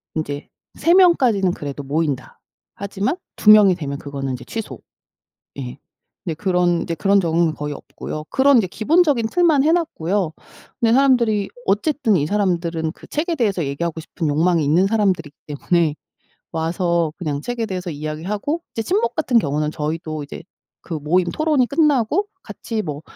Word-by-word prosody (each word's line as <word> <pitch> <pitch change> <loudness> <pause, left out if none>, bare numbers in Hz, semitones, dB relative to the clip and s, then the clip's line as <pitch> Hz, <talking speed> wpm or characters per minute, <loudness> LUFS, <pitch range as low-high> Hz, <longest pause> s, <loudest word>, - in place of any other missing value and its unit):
인제 145 -2 -4 0.3
3 335 +3 +3
명까지는 255 - +4
그래도 145 -2 -6
모인다. 145 -1 -2 0.4
하지만 200 - -2 0.2
2 210 - +2
명이 205 -3 +7
되면 140 -4 -5
그거는 140 -2 -5
이제 125 - -7
취소. 205 - -6 0.8
예 60 0 -6 0.5
근데 165 - -3
그런 180 -1 +1
이제 170 -2 -3
그런 200 +6 +3
적은 165 -1 +1
거의 150 0 -4
없고요. 150 +2 -7
그런 270 0 +5
이제 220 - +3
기본적인 280 - +2
틀만 325 -4 +3
해 315 - +3
놨고요. 195 - -1 0.5
근데 230 -1 +4
사람들이 235 -6 +3 0.2
어쨌든 225 +2 +1
이 145 - 0
사람들은 170 -5 -1
그 - - -15
책에 330 +3 -2
대해서 200 - 0
얘기하고 160 +4 -3
싶은 160 0 -4
욕망이 165 +2 +2
있는 165 +7 +3
사람들이기 190 -8 0
때문에 155 +2 +1 0.6
와서 170 0 0
그냥 150 -5 -3
책에 240 +1 -3
대해서 185 -3 -4
이야기하고 175 - -3
이제 225 - -1
친목 400 - 0
같은 260 -7 +2
경우는 150 -4 0
저희도 155 0 -4
이제 140 - -9 0.4
그 170 - -6
모임 165 +4 +1
토론이 305 -5 +1
끝나고 300 - +2 0.2
같이 220 -2 -5
뭐, 150 -2 -6
180 Hz, 350 characters per minute, -20 LUFS, 155-235 Hz, 0.8 s, 명이